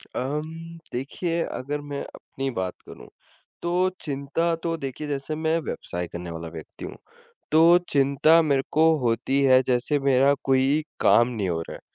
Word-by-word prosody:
अम्म 160 +5 -4 0.2
देखिए 165 +7 -2
अगर 145 +3 -4
मैं 140 - -3
अपनी 135 0 -6
बात 95 -4 -3
करूँ, - - -12 0.5
तो 180 +2 +1
चिंता 145 +4 -1
तो 165 -1 -1
देखिए, 140 +1 -5
जैसे 145 +2 -3
मैं 160 +1 0
व्यवसाय 90 - -5
करने 85 0 -7
वाला 85 0 -6
व्यक्ति 80 -2 -9
हूँ। - - -8 0.6
तो 165 +2 +7
चिंता 140 +4 +4
मेरे 140 -3 +1
को 160 +1 +5
होती 125 +3 0
है, 130 -1 +6
जैसे 130 +4 +1
मेरा 135 +1 +4
कोई 135 +3 +2 0.2
काम 120 +1 +5
नहीं 105 -6 -3
हो 80 -1 -1
रहा - - -6
है, - - -14
140 Hz, 160 wpm, -25 LUFS, 130-160 Hz, 0.6 s, तो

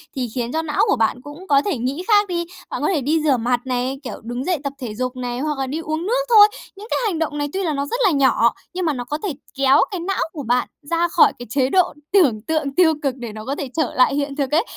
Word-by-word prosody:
thì 255 -2 -2
khiến 240 -1 -2
cho 320 - 0
não 305 -2 0
của - - +3
bạn 230 +1 0
cũng 290 +7 -11
có 280 -4 +4
thể 390 -9 0
nghĩ 260 +8 -3
khác 415 -2 +4
đi. 345 -2 -2 0.2
Bạn - - -4
có - - +1
thể 305 - 0
đi 305 +5 +1
rửa 285 -4 +3
mặt 245 +1 0
này, 255 +1 -2
kiểu, 250 - -7
đứng 240 +3 -4
dậy 360 -1 +1
tập 280 -1 -3
thể 225 -4 -5
dục 255 +2 -3
này, 245 -1 -4
hoặc 300 +1 -2
là 265 - -1
đi 290 +5 -3
uống 315 +1 -3
nước - - +1
thôi. 425 -3 +9 0.3
Những 410 +2 -10
cái - - +1
hành 370 -7 -1
động 300 -2 -2
này 290 0 -1
tuy 390 - -1
là 320 -4 0
nó 280 0 -1
rất 475 +12 -3
là 390 - +5
nhỏ 265 -5 +3 0.2
nhưng 365 0 -2
mà 310 - +1
nó 250 -3 -4
có 290 +5 -3
thể 390 -7 -1 0.2
kéo 270 0 +5
cái 380 - -3
não 380 +3 -2
của 300 -4 -6
bạn 245 +1 +1
ra 335 +4 0
khỏi - - +4
cái 245 - -7
chế 260 +2 +1
độ 365 +3 +3 0.2
tưởng 275 - +4
tượng 285 +1 -2
tiêu 335 -2 +5
cực 270 -3 0
để 235 -4 -7
nó 215 0 -8
có 275 +3 -2
thể 280 -2 -5
trở 315 -5 0
lại 255 +2 +4
hiện 280 -1 -2
thực 275 -2 -2
ấy. 315 +5 +3
285 Hz, 290 wpm, -21 LUFS, 255-335 Hz, 0.3 s, thôi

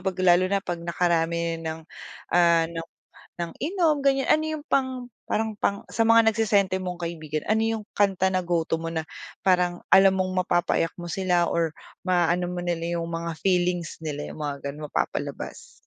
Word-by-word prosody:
'pag 190 -1 -2
lalo 175 0 +6
na 200 +1 +1
'pag 175 -3 -4
nakarami 170 -1 0
ng, 160 0 -5 0.5
ah, 170 -1 +5
ng 165 0 -5 0.5
ng 170 -1 -4
inom, 325 0 +2
ganyan. 270 -1 +2
Ano 310 - +4
yung 310 -1 -4
pang 260 -4 0 0.2
parang 220 -1 -1
pang 200 -1 0
sa - - +1
mga 230 0 +6
nagse-senti 200 -4 +2
mong 180 -1 -5
kaibigan. 155 -2 -4
Ano 220 +1 +3
yung 225 -1 -1
kanta 190 -2 +3
na 185 - +2
go 170 -1 +1
to 165 - 0
mo 165 - -3
na 160 - -1 0.4
parang 180 -2 +2
alam 195 0 +7
mong 185 -1 0
mapapaiyak 175 -1 +1
mo - - -6
sila 180 -1 +1
or 165 -2 0 0.3
maaano 175 -1 +2
mo 180 0 -4
nila 170 -1 -2
yung 165 - -3
mga 165 0 -3
feelings 180 -3 0
nila 145 -1 -4
yung - - -11
mga 140 -1 -4
gano'n, 150 +2 -7
mapapalabas? - - -4
175 Hz, 180 wpm, -25 LUFS, 170-200 Hz, 0.5 s, alam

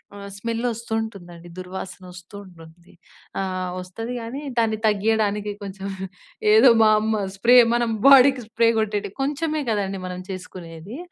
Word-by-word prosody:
ఆహ్, 200 0 -9
స్మెల్లోస్తూంటుందండి, 220 -6 -4
దుర్వాసనొస్తూంటుంది. 180 -2 -10 0.5
ఆహ్, 185 -1 -3
వస్తది 225 +7 -6
గానీ, 240 +5 -6 0.2
దాన్ని 225 -2 +1
తగ్గీయడానికి 210 0 0
కొంచెం, 195 0 -7 0.7
ఏదో 225 +4 +7
మా 220 - +6
అమ్మ 220 -1 -1
స్ప్రే 235 +5 +4 0.2
మనం 240 -1 0 0.2
బాడీకి 270 -2 +7
స్ప్రే 230 0 +1
కొట్టేటి 210 -2 -2
కొంచెమే 300 +2 -1
కదండి 195 -3 -1
మనం 180 0 -6
చేసుకునేది. 185 - -9
205 Hz, 115 wpm, -23 LUFS, 185-230 Hz, 0.7 s, ఏదో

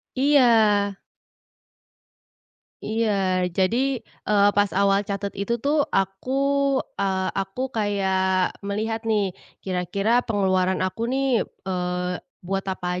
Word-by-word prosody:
Iya. 225 -7 +4 1.9
Iya, 195 -5 0
jadi, 245 +8 +1 0.2
eee, 205 -1 +4
pas 205 -1 +3
awal 200 +1 +2
catat 200 0 -3
itu 200 +4 -1
tuh 290 +1 +2
aku, 195 +5 -1 0.7
eee, 190 -1 0
aku 195 +6 -3
kayak 190 -4 0
melihat 220 +2 -2
nih, 210 -3 +1 0.3
kira-kira 195 +5 0
pengeluaran 190 -4 +1
aku 225 +5 -2
nih, 265 -1 +1
eee, 180 -1 -3 0.3
buat 195 +2 -1
apa 180 -1 -2
200 Hz, 100 wpm, -24 LUFS, 190-225 Hz, 1.9 s, Iya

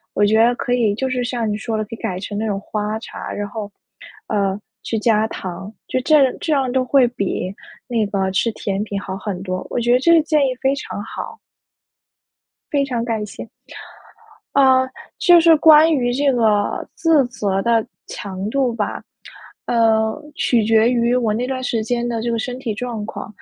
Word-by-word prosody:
我 205 - +3
觉 220 +2 +4
得 240 +1 +3
可 245 - -2
以 225 -5 +2
就 265 +5 -2
是 255 -1 -1
像 240 -2 -2
你 - - -1
说 220 0 -3
的 215 - -1
可 - - -30
以 - - -4
改 180 - -3
成 205 +2 -5
那 220 - -1
种 200 -2 -1
花 210 +1 -3
茶。 - - -8
然 205 0 -4
后， 205 0 -6 0.6
呃， 200 -2 0 0.2
去 225 - -3
加 220 0 +2
糖， 190 -1 -7 0.2
就 255 - -1
这 310 +5 +3
样 260 - +2
这 320 - -2
样 265 -3 0
就 260 -1 +2
会 255 0 +4
比 195 -4 -3 0.3
那 235 -3 0
个 195 -1 -1
吃 210 +5 +1
甜 200 -1 -3
品 205 -2 -4
好 190 -1 -6
很 190 -1 -5
多。 185 -1 -4
我 - - -2
觉 240 +1 +2
得 250 - +4
这 335 +6 +3
个 330 -2 +6
建 305 -1 +2
议 255 - -2
非 270 0 +2
常 235 -6 -6
好。 455 - -7 1.3
非 285 -1 +2
常 245 -4 -2
感 220 -3 -2
谢。 205 - -9 1.1
呃， 260 -1 +4 0.3
就 350 -1 +6
是 330 -1 +6
关 315 +1 +7
于 245 -5 +1
这 275 +2 +2
个 215 -4 +1
自 315 -5 +3
责 200 -5 -1
的 230 -1 +2 0.2
强 195 0 -6
度 260 -2 0
吧。 215 -3 -3 0.6
呃， 220 -2 +2 0.2
取 235 -6 +1
决 225 +1 +4
于 240 0 +2
我 235 -4 +1
那 240 +3 -1
段 260 0 -3
时 230 -3 -1
间 240 +1 -1
的 230 -2 -2
这 235 - -1
个 230 - -1
身 250 +2 -4
体 230 -4 -3
状 230 -1 -4
况。 - - -7
230 Hz, 215 characters per minute, -20 LUFS, 210-255 Hz, 1.3 s, 关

